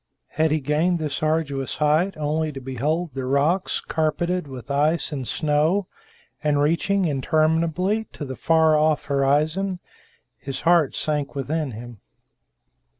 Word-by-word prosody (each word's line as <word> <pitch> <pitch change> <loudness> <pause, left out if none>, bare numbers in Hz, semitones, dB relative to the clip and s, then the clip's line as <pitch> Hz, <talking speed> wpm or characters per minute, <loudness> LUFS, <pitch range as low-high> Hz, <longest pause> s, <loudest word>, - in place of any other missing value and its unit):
Had 160 +1 +1
he 155 +1 +1
gained 155 +5 +1
this 150 -3 -3
arduous 155 -4 -1
height 155 +6 +2
only 155 +1 -1
to 135 - -6
behold 145 +5 -2
the 135 0 -4
rocks 145 +8 +1
carpeted 170 +2 -1
with 130 0 -8
ice 150 +3 +1
and 135 -4 -4
snow, 155 +6 +1 0.6
and 150 -1 +2
reaching 170 +6 +1
interminably 160 +7 +1
to 150 - -6
the 130 -1 -6
far 160 0 +3
off 155 -1 +2
horizon? 150 +7 +1 0.6
His 135 -1 -6
heart 165 -4 +3
sank 150 -2 -2
within 140 0 -2
him. 120 0 -9
155 Hz, 135 wpm, -23 LUFS, 140-165 Hz, 0.6 s, far